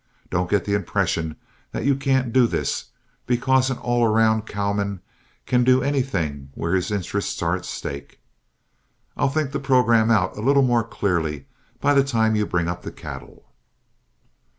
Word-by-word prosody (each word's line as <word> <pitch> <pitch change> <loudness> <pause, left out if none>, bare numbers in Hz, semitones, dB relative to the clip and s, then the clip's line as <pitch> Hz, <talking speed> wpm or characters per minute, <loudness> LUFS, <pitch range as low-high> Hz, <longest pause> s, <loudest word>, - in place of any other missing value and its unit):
Don't 90 +1 0
get 105 -3 +1
the 100 - -1
impression 85 -5 -1 0.4
that - - -3
you 140 - +4
can't 130 -3 0
do 125 -2 +5
this, - - -2 0.4
because 130 +2 +2
an 130 - -2
all 120 -1 +1
round 110 0 +2
cowman 100 -1 -2 0.5
can 125 -1 +2
do 130 +1 +4
anything 95 - -1
where 85 +2 -2
his 90 -1 +1
interests 100 -4 -2
are - - +1
at - - -7
stake. 70 0 -7 1.0
I'll - - +1
think 145 -1 -1
the 140 - -2
programme 120 -4 +3
out 100 -5 +2
a - - -6
little 140 +3 +4
more 120 -2 +3
clearly 85 - -2 0.3
by 145 - +3
the 140 -1 +5
time 110 -5 +1
you 105 -1 0
bring 85 -1 0
up 90 0 -3
the - - -7
cattle." - - -10
110 Hz, 165 wpm, -23 LUFS, 95-130 Hz, 1.0 s, do